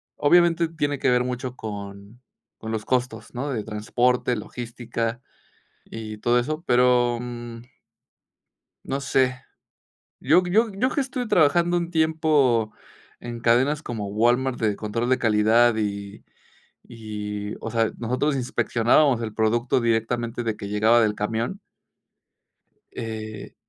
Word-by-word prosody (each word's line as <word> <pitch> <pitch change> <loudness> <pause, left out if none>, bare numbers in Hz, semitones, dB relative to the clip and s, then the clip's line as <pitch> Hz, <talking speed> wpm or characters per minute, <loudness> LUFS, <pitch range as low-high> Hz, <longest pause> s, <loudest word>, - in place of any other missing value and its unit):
obviamente, 170 +2 +4
tiene 145 -3 -2
que - - +2
ver 125 0 +3
mucho 125 0 -4
con 100 +1 -8 0.4
con 110 - -6
los 110 -2 -3
costos, 120 -3 -2
¿no?, 130 +4 -3
de 115 -6 -2
transporte, 120 +4 0
logística 115 +1 -4 0.7
y 110 -1 -7
todo 120 +3 +2
eso, 155 +6 -3
pero, 125 -1 +3
mm 120 -1 -8 1.2
No 135 +1 -2
sé. 130 -1 +1 0.8
Yo 165 +7 +4
yo 215 +6 +2
yo 225 +7 +1
que 285 - -2
estuve 255 -3 -3
trabajando 175 +1 +3
un 170 0 -3
tiempo 155 -8 +2 0.5
en 120 -1 -6
cadenas 130 +6 +2
como 110 -8 -5
Walmart 120 +5 +1
de 105 -3 +1
control 115 +4 -3
de 130 - +3
calidad 110 +1 +3
y 100 -1 -4 0.7
y, 105 -2 -5
o 115 - -5
sea, 115 -1 +1
nosotros 130 +6 0
inspeccionábamos 120 +1 +2
el 110 -2 -5
producto 115 +3 +1
directamente 115 +1 -1
desde 110 -2 -2
que 100 - -7
llegaba 110 +3 +4
del 105 -1 +1
camión 115 - -3 1.3
Eh 110 -2 -7
120 Hz, 130 wpm, -24 LUFS, 110-135 Hz, 1.3 s, obviamente